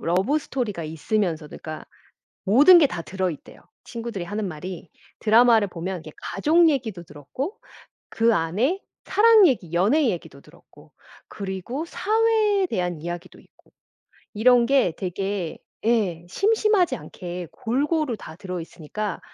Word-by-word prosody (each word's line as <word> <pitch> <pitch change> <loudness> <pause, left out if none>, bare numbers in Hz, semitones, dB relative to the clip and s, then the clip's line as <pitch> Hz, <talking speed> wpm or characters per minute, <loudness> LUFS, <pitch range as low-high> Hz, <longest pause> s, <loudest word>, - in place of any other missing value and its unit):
러브 190 - +1
스토리가 235 - -4
있으면서도 160 0 -2
그러니까 155 -1 -7 0.6
모든 285 - +7
게 305 - +5
다 170 - -5
들어있대요. 185 -4 -5 0.2
친구들이 230 -6 -6
하는 205 +3 -3
말이 175 +2 -8 0.3
드라마를 225 -1 +5
보면 180 +1 -5
이렇게 155 -1 -11
가족 325 - +3
얘기도 235 - -2
들었고, 175 - -7 0.5
그 230 0 +2
안에 215 - 0 0.3
사랑 440 -1 +6
얘기, 190 - -2
연애 215 - +3
얘기도 165 -7 -6
들었고 - - -20 0.3
그리고 200 - -5
사회에 425 +1 +1
대한 175 - -2
이야기도 175 +1 -7
있고 - - -29 0.6
이런 240 +2 +4
게 265 -10 +3
되게 190 -1 -3 0.3
예. 205 -8 +1
심심하지 415 - +2
않게 175 -5 -8
골고루 270 +2 -1
다 160 -5 -11
들어있으니까 180 +2 -6
210 Hz, 310 characters per minute, -24 LUFS, 175-275 Hz, 0.6 s, 모든